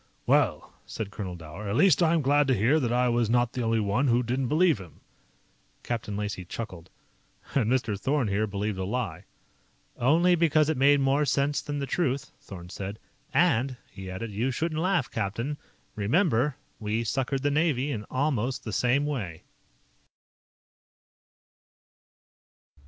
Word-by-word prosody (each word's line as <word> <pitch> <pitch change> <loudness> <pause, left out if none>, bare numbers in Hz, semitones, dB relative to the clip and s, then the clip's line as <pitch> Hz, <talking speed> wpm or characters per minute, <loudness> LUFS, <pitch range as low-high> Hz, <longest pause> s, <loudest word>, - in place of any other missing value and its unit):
"Well," - - +2
said 105 -2 -5
Colonel 95 -4 -5
Dower, 85 +5 -8
"at 100 - -1
least 185 +2 +5
I'm 165 -2 +3
glad 145 +1 +3
to 130 - +3
hear 120 +10 +3
that 120 -5 -1
I 125 +1 +2
was 120 -2 +1
not 120 0 +2
the 125 - -2
only 115 -1 +1
one 105 +7 +1
who 120 0 +3
didn't 125 +2 -1
believe 160 - +3
him." 90 -5 -13 0.8
Captain 115 -4 -3
Lacey 105 -3 -3
chuckled. 90 -3 -7 0.6
"And 120 -4 +2
Mr. 120 -5 +1
Thorn 135 +2 +1
here 105 +2 0
believed 100 0 -3
a - - -1
lie." 100 -4 -3 0.7
"Only 165 +8 +3
because 155 -3 +3
it 160 - +1
made 140 +2 +5
more 135 +2 +2
sense 145 0 +1
than 145 0 -4
the 140 - -2
truth," 140 -3 -1
Thorn 90 -3 -10
said. 100 +2 -6 0.3
"And," 135 -6 +2
he 95 -1 -8
added, 105 +4 -5
"you 110 +6 -1
shouldn't 155 +4 -2
laugh, 180 -7 +1
captain. 115 +8 -3 0.4
Remember, 130 - +2 0.2
we 110 +1 -1
suckered 135 +3 -1
the 145 - +2
Navy 145 -2 +1
in 105 -5 -4
almost 130 -1 -1
the 110 - -5
same 125 +7 +2
way." 105 - -4
125 Hz, 155 wpm, -27 LUFS, 105-145 Hz, 0.8 s, least